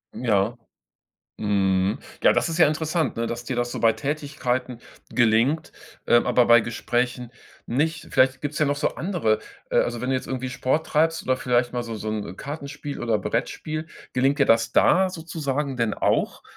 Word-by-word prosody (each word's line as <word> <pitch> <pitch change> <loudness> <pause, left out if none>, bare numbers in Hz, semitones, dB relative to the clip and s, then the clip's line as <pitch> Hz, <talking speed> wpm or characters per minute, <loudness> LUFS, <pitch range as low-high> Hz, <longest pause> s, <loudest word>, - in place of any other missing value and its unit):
Ja. 110 -1 +1 0.8
Mhm, 100 0 +1 0.2
ja, - - +6
das - - +1
ist 165 0 -3
ja 160 - +7
interessant, 155 0 -1
ne, 115 - 0
dass 120 +1 -4
dir 130 - -3
das 120 0 -1
so - - -4
bei 115 - +5
Tätigkeiten 135 -4 -3 0.3
gelingt, 120 +6 +2 0.3
ähm, 120 - +4
aber 125 - +4
bei 120 0 +7
Gesprächen 120 +1 -2 0.3
nicht. 155 +5 -1
Vielleicht 130 0 +3
gibt's 145 +1 -4
ja 150 - +3
noch 145 - +1
so 145 - +1
andere 165 - 0 0.3
äh, - - +2
also, 120 -1 +1
wenn 125 +2 -3
du - - +2
jetzt 130 - -4
irgendwie 130 -1 -3
Sport 135 +5 0
treibst 165 +2 +1
oder 130 - +1
vielleicht 125 -1 0
mal 125 - -1
so 115 -1 -6
so 110 0 -6
'n 105 -4 -4
Kartenspiel 145 0 -6
oder 115 -2 +1
Brettspiel, 155 +9 -3 0.3
gelingt 135 +3 +2
dir 140 - +4
das 115 0 +3
da 190 +1 +4
sozusagen 150 -5 -3
denn 115 -3 0
auch, - - 0
130 Hz, 180 wpm, -24 LUFS, 115-150 Hz, 0.8 s, ja